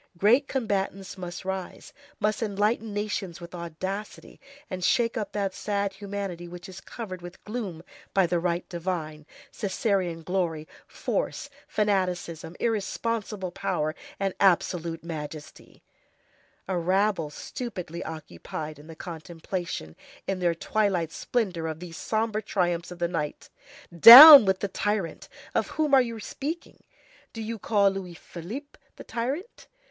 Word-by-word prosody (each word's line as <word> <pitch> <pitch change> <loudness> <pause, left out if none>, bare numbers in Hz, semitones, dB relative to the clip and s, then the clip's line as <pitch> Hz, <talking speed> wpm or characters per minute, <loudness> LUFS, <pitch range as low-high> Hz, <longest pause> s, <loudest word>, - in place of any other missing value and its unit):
Great 240 - +4
combatants 195 -6 -2
must 180 -1 -7
rise, 190 -1 -5 0.3
must 215 +1 0
enlighten 215 +1 0
nations 205 -4 -3
with 170 0 -10
audacity, 185 +4 -6 0.3
and 185 -2 -5
shake 230 +4 +2
up 215 -4 -3
that 200 -2 -2
sad 200 -1 -2
humanity 195 -3 -5
which 175 +2 -9
is 190 0 -10
covered 190 -6 -7
with 175 +1 -11
gloom 205 -7 -5 0.3
by 195 -2 +3
the 175 0 0
right 175 0 -1
divine, 165 -4 -4 0.3
Cæsarian 190 -5 -1
glory, 170 -4 -1 0.2
force, - - -3 0.2
fanaticism, 180 -5 -1
irresponsible 215 -3 -2
power, 175 -5 -2 0.3
and 195 -1 0
absolute 170 -3 +2
majesty; 155 -2 -8 0.8
a 190 - -1
rabble 185 -2 +1
stupidly 180 -1 -6
occupied 155 - -7
in 150 - -14
the 165 - -10
contemplation, 165 - -6 0.3
in 195 -1 -2
their 175 -2 +1
twilight 185 -3 0
splendor, 185 -9 -2
of 160 -1 -5
these 175 -1 -9
sombre 220 +4 -1
triumphs 175 -4 -1
of 180 - -9
the 175 0 0
night. 155 -4 -4 0.4
Down 265 - +13
with 190 -1 +1
the 200 - 0
tyrant! 205 -2 -2 0.2
Of - - +1
whom 305 -2 -1
are 270 - +8
you 230 -2 -4
speaking? 300 +10 -6 0.5
Do 225 - -6
you 225 0 -5
call 200 -1 +3
Louis 185 -3 -6
Philippe 215 - -9 0.2
the - - -10
tyrant? 275 - -4
190 Hz, 135 wpm, -27 LUFS, 170-210 Hz, 0.8 s, Down